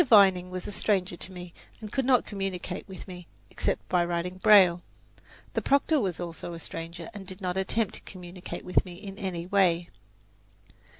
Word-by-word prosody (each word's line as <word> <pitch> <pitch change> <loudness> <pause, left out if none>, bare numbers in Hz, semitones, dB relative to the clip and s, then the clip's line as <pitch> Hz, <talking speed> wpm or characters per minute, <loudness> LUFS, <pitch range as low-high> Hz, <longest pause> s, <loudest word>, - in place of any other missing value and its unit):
Vining 195 -6 +6
was 185 -1 -5
a - - -4
stranger 190 -3 +1
to 185 - -4
me, 180 -1 -9 0.3
and 215 -2 -8
could 265 -2 0
not 255 -2 +4
communicate 195 -2 -4
with 190 0 -9
me, 180 -2 -9 0.2
except - - -1
by 180 -1 +3
writing 175 +2 -2
braille. 185 -5 +7 0.7
The - - 0
proctor 280 +2 +3
was 190 -8 -1
also 170 0 -5
a - - -8
stranger, 165 +4 -6
and 195 -3 -9
did 185 +1 -4
not 180 -2 -2
attempt 190 +2 0
to - - -5
communicate 180 -1 -8
with 180 - +2
me 180 -2 -9
in 195 +1 -9
any 175 -3 -3
way. 175 -3 +2
185 Hz, 180 wpm, -28 LUFS, 175-200 Hz, 0.7 s, braille